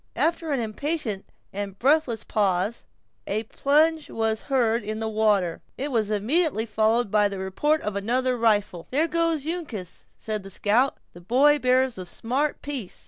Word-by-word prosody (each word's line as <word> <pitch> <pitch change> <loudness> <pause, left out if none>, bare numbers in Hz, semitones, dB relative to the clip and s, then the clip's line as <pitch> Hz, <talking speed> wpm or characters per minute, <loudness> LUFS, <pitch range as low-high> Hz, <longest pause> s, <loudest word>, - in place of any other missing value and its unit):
After 330 -1 0
an 275 - +1
impatient 230 -1 -3 0.3
and 200 -1 -5
breathless 265 -3 +2
pause, 200 +1 0 0.4
a 215 +3 -1
plunge 305 +7 +2
was 220 -1 -1
heard 235 -4 +2
in 215 +1 -4
the 220 0 -2
water, 210 -6 +1 0.2
and 270 - -3
it 290 - -4
was 220 -4 +1
immediately 225 - +1
followed 220 0 +1
by 210 -1 +4
the 200 -1 -6
report 280 +12 0
of 210 -1 -3
another 250 +5 0
rifle. 205 -7 +1
"There 300 +5 +1
goes 330 -3 0
Uncas!" 290 - -5
said 215 -1 -4
the 195 - -10
scout; 220 +7 +1 0.2
"the 175 - -13
boy 275 +10 +4
bears 255 -3 +2
a 180 - -6
smart 260 +11 -2
piece! 270 -10 -5
225 Hz, 165 wpm, -25 LUFS, 205-285 Hz, 0.4 s, by